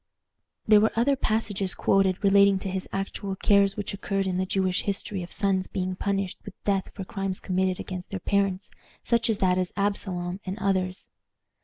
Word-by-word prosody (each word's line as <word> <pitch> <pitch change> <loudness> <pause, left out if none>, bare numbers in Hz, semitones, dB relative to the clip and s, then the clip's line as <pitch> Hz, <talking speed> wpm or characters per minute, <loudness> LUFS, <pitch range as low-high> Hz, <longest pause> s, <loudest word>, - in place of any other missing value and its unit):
There 210 -1 +7
were 220 - +3
other 255 +5 +3
passages 210 -6 0
quoted 195 0 +2
relating 200 0 +5
to 190 0 -4
actual 195 0 -3
cases 200 0 +3
which 205 - -3
occurred 195 0 -2
in 185 -1 -1
the 185 - -1
Jewish 185 -1 +1
history 200 -1 -2
of 175 - -8
sons 195 -2 +1
being 185 -1 -3
punished 195 -1 -2
with 205 - -10
death 195 -2 0
for 195 - -6
crimes 195 0 -3
committed 185 0 0
against 185 -1 -6
their 195 - -4
parents, 195 0 0 0.3
such 235 -1 +1
as 220 - +2
that 185 -1 +2
of 180 -1 -1
Absalom, 190 -3 -2
and 190 +1 -5
others. 185 -2 -1
195 Hz, 175 wpm, -26 LUFS, 185-200 Hz, 0.3 s, There